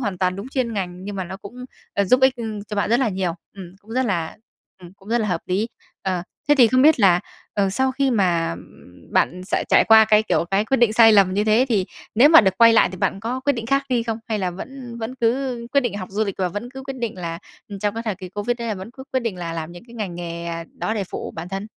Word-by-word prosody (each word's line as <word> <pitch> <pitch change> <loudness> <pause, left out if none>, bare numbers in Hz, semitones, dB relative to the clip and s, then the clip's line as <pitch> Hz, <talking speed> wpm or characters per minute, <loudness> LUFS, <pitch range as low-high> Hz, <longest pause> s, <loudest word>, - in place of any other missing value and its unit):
hoàn 205 -7 -3
toàn 185 0 0
đúng 205 +6 -7
chuyên 255 -4 -2
ngành, 185 -2 -4
nhưng 205 -1 -6
mà 190 - -3
nó 190 +2 -7
cũng, 235 +6 -10 0.3
ờ, 200 - +2
giúp 255 +7 +3
ích 265 -1 +4 0.3
cho 210 - -5
bạn 200 - 0
rất 240 - +3
là 255 - +2
nhiều. 185 -3 -2 0.2
Ừm, 185 -1 -10
cũng 215 - -19
rất 255 +1 0
là 170 -5 -2 0.5
ừm, 175 0 -12
cũng 195 +1 -18
rất 240 +1 +2
là 215 - -1
hợp 175 -2 -1
lý. 200 +6 0 0.3
Ờ, 185 -2 -1 0.3
thế 295 - +6
thì 245 - +8
không 255 +2 +3
biết 305 -3 +5
là, 180 -3 +5 0.3
ờ, 195 -2 +1
sau 260 +5 +1
khi 275 0 +1
mà 175 - +1 0.6
bạn 180 +2 +1
sẽ - - -1
trải - - +5
qua 220 0 +8
cái, 215 0 +4
kiểu, 215 - 0
cái 200 +2 +2
quyết 265 +4 +1
định 235 -2 +3
sai 225 0 +7
lầm 195 -3 +4
như 205 +2 +1
thế 220 +4 +4
thì 200 -6 +1 0.3
nếu 255 +7 +7
mà 325 - +9
được 190 -2 0
quay 230 -1 +7
lại 225 - +5
thì 185 - -6
bạn 195 - -1
có 245 +5 -3
quyết 285 +2 +1
định 230 -4 -5
khác 275 +2 +2
đi 245 -3 +1
không? 225 -1 -3
Hay 220 - -1
là 185 -2 -1
vẫn 245 +5 -9
vẫn 230 +3 -5
cứ 250 +1 0
quyết 280 - +4
định 240 -6 -3
học 185 - -6
du 215 +3 0
lịch, 200 -3 -4
và 185 -1 +1
vẫn 205 +7 -6
cứ 265 0 -9
quyết 270 0 -6
định 235 -4 -3
là 165 -1 -4 0.4
trong 205 0 -1
cái 230 - -4
thời 215 -4 -2
kỳ 185 -1 -9
Covid 205 +5 -2
đấy 235 -1 -4
là 215 - -1
vẫn 190 +3 -8
cứ 265 +2 -11
quyết 260 - +1
định 230 -6 -3
là 170 -2 -5
làm 165 0 -5
những 175 - -12
cái 235 - -14
ngành 205 -6 -4
nghề, 170 -1 -6
ờ, 165 0 -4
đó 220 - -1
để 205 -3 -2
phụ - - -5
bản 165 +2 -6
thân? 195 +2 -5
210 Hz, 285 wpm, -22 LUFS, 185-240 Hz, 0.6 s, mà